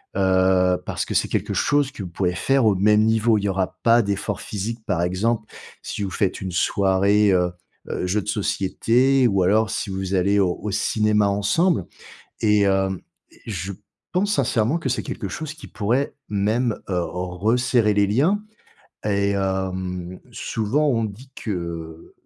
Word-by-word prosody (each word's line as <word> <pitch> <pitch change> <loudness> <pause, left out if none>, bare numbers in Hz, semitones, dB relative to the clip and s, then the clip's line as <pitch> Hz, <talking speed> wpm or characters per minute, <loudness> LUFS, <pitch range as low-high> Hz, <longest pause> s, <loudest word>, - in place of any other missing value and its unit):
heu, 95 -1 +3
parce - - -2
que - - -5
c'est - - +2
quelque - - -1
chose 145 -1 +2
que 105 - -7
vous 90 - -6
pouvez 90 +1 -1
faire 135 +6 +2
au 105 -2 +4
même 105 +3 +4
niveau. 110 0 +3
Il 100 - -5
y 100 - +1
aura 95 -1 -1
pas 115 0 +5
d'effort 100 -1 -2
physique, 110 +3 -5
par 90 -5 0
exemple, 105 +6 0 0.4
si 105 - -4
vous 95 - -3
faites 100 -3 -1
une 95 -1 -4
soirée, 100 +3 +3
heu, 90 -1 +2 0.4
heu, - - -2
jeux 105 +4 +1
de 100 - -12
société 115 +6 +2
ou 95 -4 +2
alors 110 +4 +3
si - - -3
vous 95 0 -3
allez 100 +2 +2
au 90 -3 +2
au 105 - -3
cinéma 105 +1 +2
ensemble 105 - +1 0.6
et 105 -2 +4
hem 95 -1 +1 0.3
et - - -22
je 95 -3 -4 0.4
pense 200 +3 +1
sincèrement 120 - +1
que 150 - -3
c'est 130 - -1
quelque 100 - -5
chose 155 +9 -5
qui 155 - -12
pourrait 120 +7 -1 0.2
même, 110 +3 0
heu, 90 -2 0
resserrer 105 +7 +1
les 100 0 +3
liens 155 - +2 0.6
et 100 -1 +1
hem, 95 -2 -3
souvent 120 +8 -1
on 115 -5 +1
dit 110 +6 -8
qu'il 85 -5 -6
100 Hz, 170 wpm, -22 LUFS, 95-115 Hz, 0.6 s, pas